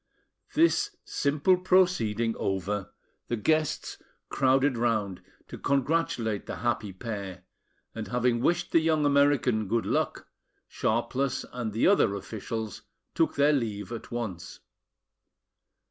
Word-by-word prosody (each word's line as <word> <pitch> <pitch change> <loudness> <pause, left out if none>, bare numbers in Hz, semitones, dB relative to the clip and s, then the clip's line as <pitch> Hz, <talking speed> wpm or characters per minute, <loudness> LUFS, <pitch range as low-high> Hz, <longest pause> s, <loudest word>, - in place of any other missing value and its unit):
This 335 +2 +3
simple 150 +6 +2
proceeding 175 - +2
over, 95 +1 -2 0.4
the 120 - -1
guests 155 +7 0 0.3
crowded 135 0 +2
round 110 -5 -1 0.3
to - - -9
congratulate 135 -7 0
the - - -4
happy 110 -3 -1
pair, 100 -2 -6 0.5
and 110 -1 -5
having 125 -1 +1
wished 175 +5 +1
the 165 - +5
young 160 -2 +2
American 140 -7 +3
good 115 +3 0
luck, - - -1 0.4
Sharpless 125 +4 -1
and 120 -3 -3
the 110 - +1
other 150 - +4
officials 110 +2 -5 0.3
took 165 - +1
their 145 +1 +4
leave 110 -6 -2
at 115 -1 -7
once. 110 -8 -5
120 Hz, 115 wpm, -28 LUFS, 110-145 Hz, 0.5 s, the